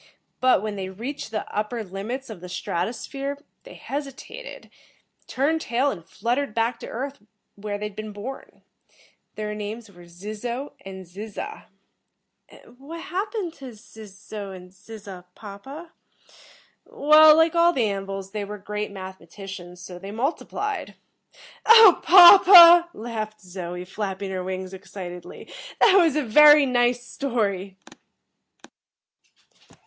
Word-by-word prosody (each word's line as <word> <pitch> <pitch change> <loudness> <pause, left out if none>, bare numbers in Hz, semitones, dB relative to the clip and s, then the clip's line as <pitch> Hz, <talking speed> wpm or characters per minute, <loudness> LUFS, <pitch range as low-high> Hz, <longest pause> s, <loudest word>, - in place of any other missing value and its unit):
But 255 -6 +3
when 210 -1 -4
they 190 -1 -5
reached 235 +8 -7
the 215 -1 -5
upper 215 +2 -3
limits 215 +7 -6
of 190 -6 -10
the 180 - -9
strato 180 +2 -3
sphere, 275 +3 -6 0.3
they - - -12
hesitated, 290 - -8 0.6
turned 310 +5 -1
tail 255 +3 0
and 170 -8 -8
fluttered 235 +8 -3
back 230 +1 -1
to - - -9
Earth 275 +3 -6 0.3
where 205 0 -6
they 210 - -5
had 210 -1 -8
been 215 0 -7
born. 210 +7 -10 0.7
Their 210 0 -4
names 210 +1 -7
were 175 -2 -16
Zizzo 215 +9 -6
and 190 -1 -9
Zizza." 210 - -8 0.8
"And 245 +2 -19
what 320 +5 -9
happened 390 -1 -4
to 260 -3 -9
Zizzo 210 -1 -11
and 180 -1 -11
Zizza, 200 -3 -12
papa?" 265 +11 -11 0.9
"Well, 305 +1 +6
like 325 0 +3
all 340 0 +4
the 255 -9 0
An 195 -1 -4
vils, 195 0 -7
they 210 0 -4
were 210 +1 -7
great 210 +1 -5
mathematicians. 190 -1 -10
So, 180 -1 -10
they 195 +2 -9
multiplied." 305 - -4 0.7
"Oh, 450 -5 +8
papa," 350 -1 +9
laughed 215 -1 -6
Zoe, 180 -1 -7
flapping 195 0 -5
her 185 -1 -4
wings 185 0 -6
excitedly, 180 -2 -10 0.3
"that 390 - +5
was 335 -6 +4
a 300 - 0
very 295 +5 +7
nice 245 -1 +1
story!" 200 -9 -3
215 Hz, 135 wpm, -23 LUFS, 195-280 Hz, 0.9 s, papa